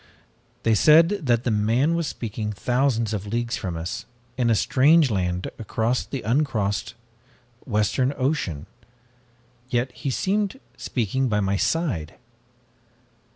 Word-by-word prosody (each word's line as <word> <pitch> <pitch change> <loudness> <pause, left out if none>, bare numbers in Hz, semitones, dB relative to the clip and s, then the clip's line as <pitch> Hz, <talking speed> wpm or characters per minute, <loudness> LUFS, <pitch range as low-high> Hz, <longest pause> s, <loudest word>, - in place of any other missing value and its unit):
They 115 - +3
said 155 - +6 0.2
that 120 -1 +2
the 120 - 0
man 115 +9 +2
was 170 -2 -1
speaking 110 -3 -4
thousands 120 -1 0
of 105 -1 -4
leagues 120 +3 -1
from 90 -5 -4
us, 90 +9 -5 0.3
in 125 -2 +1
a 115 - +4
strange 145 +5 +4
land 90 -2 -1
across 115 +2 -1
the 135 - -5
uncrossed 105 -5 0 0.7
western 115 +4 +1
ocean, 130 - -1 1.0
yet 125 +1 0
he 135 - -5
seemed 200 - -1 0.2
speaking 130 +2 -1
by 105 -1 +1
my 100 -1 0
side! 100 - -1
120 Hz, 125 wpm, -24 LUFS, 105-135 Hz, 1.0 s, said